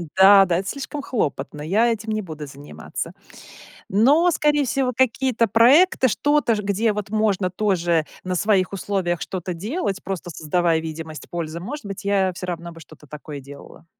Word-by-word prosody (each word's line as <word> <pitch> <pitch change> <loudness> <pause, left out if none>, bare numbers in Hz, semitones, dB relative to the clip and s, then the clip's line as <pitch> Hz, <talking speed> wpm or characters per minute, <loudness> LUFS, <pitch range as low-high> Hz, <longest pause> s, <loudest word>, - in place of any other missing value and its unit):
Да 195 +1 +8
да, 175 -2 +1
это 195 - -5
слишком 280 +3 -5
хлопотно, 150 - -3
я 210 +10 +2
этим 220 -1 -4
не 215 0 -1
буду 155 -5 -8
заниматься. 140 - -7 0.8
Но, 280 - +4
скорее 295 -3 +2
всего, 255 0 0
какие-то 255 -1 +2
проекты, 260 - +5
что-то 275 0 +2
ж, 210 - -2
где, 205 +2 +1
вот, 205 -1 -5
можно 205 -4 +1
тоже 175 -5 0 0.2
на 185 0 -2
своих 195 0 +1
условиях 190 -3 -2
что-то 180 -1 -4
делать, 200 - -3
просто 190 -2 -5
создавая 165 +1 0
видимость 160 -1 -7
пользы. 170 -1 -4
Может 250 - -7
быть, 195 0 -7
я 195 -2 +1
всё 180 - -6
равно 170 -1 -5
бы 165 - -13
что-то 150 -1 -16
такое 150 0 -8
делала. 145 +4 -13
195 Hz, 165 wpm, -22 LUFS, 170-230 Hz, 0.8 s, Да